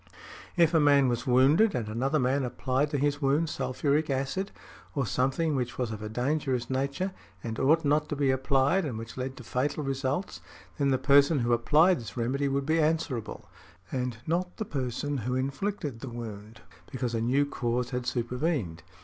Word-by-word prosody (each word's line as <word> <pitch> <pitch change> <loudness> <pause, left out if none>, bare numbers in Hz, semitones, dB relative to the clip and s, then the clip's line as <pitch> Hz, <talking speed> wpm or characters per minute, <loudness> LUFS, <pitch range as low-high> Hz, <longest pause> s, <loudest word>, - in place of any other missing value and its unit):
If 170 -1 +4
a 165 - +5
man 140 -3 +5
was 120 +2 -2
wounded 140 - +4
and 115 -3 -2
another 130 +8 0
man 135 +1 +1
applied 130 +3 -1
to 145 - -1
his 145 +1 0
wound 145 +4 +2
sulphuric 140 +4 0
acid, 135 +9 -1 0.5
or 140 -3 +1
something 135 +8 0
which 125 -2 -2
was 125 -3 -2
of 110 -1 -6
a 105 - -5
dangerous 125 0 -1
nature, 140 +9 -1 0.3
and 110 -1 -4
ought 155 +4 +3
not 150 +1 +2
to - - -2
be 140 -2 +2
applied, 135 +7 +2
and 130 -8 -3
which 115 +1 -8
led 130 +1 -4
to 125 - -9
fatal 135 +6 -1
results, 135 +6 -2 0.4
then 140 -1 +2
the 130 - +3
person 140 +3 +5
who 120 0 +2
applied 155 +9 +4
this 115 +1 -9
remedy 130 +4 0
would 140 0 -1
be 160 +2 +2
answerable, 150 -7 -1 0.4
and 125 -3 -2
not 180 +3 -1
the 220 - -3
person 140 -1 -3
who 125 +1 -2
inflicted 140 - -2
the 130 - -6
wound, 110 -2 -8 0.3
because 125 -3 -3
a 115 - 0
new 130 +5 +2
cause 125 -2 -2
had 125 -1 -3
supervened. 125 - -1
135 Hz, 185 wpm, -28 LUFS, 125-150 Hz, 0.5 s, a